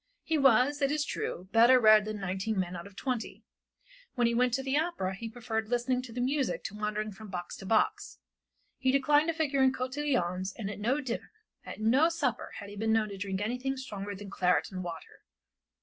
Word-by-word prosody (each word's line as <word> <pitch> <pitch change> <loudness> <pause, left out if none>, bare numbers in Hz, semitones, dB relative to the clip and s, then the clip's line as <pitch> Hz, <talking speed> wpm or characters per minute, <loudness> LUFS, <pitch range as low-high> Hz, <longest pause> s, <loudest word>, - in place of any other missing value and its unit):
He 325 - 0
was, 275 +1 +4
it 275 - +3
is 300 0 0
true, 180 -8 -4
better 240 +3 +7
read 215 -2 +6
than 215 -1 -4
nineteen 195 +2 -2
men 180 -1 -2
out 170 +2 -7
of 200 - -16
twenty; 250 +1 -4 0.7
when 245 -2 +2
he 235 - +2
went 250 +1 +3
to 265 - -2
the 265 +1 -1
opera 300 - 0
he 225 +4 -6
preferred 225 -2 -3
listening 250 +1 +1
to 255 -2 -10
the 240 - -5
music 265 +1 0
to - - -5
wandering 210 0 -2
from 210 +2 -11
box 175 -2 -5
to 195 - -9
box; 220 +1 +1 0.6
he 260 -1 +2
declined 290 +3 +3
to 330 - +1
figure 290 -4 +1
in 265 0 +5
cotillons 255 -9 -1
and 205 -4 -4
at 205 - -8
no 255 +8 +1
dinner, 245 -4 -5 0.4
at - - -7
no 260 +9 +4
supper 295 -8 -2
had 200 - -8
he 205 - -9
been 220 +2 0
known 220 -1 +2
to 200 - -7
drink 195 0 -3
anything 250 +5 -2
stronger 205 -6 -6
than 200 0 -9
claret 180 0 +1
and 185 -1 -5
water. 170 -2 -8
230 Hz, 210 wpm, -30 LUFS, 200-265 Hz, 0.7 s, better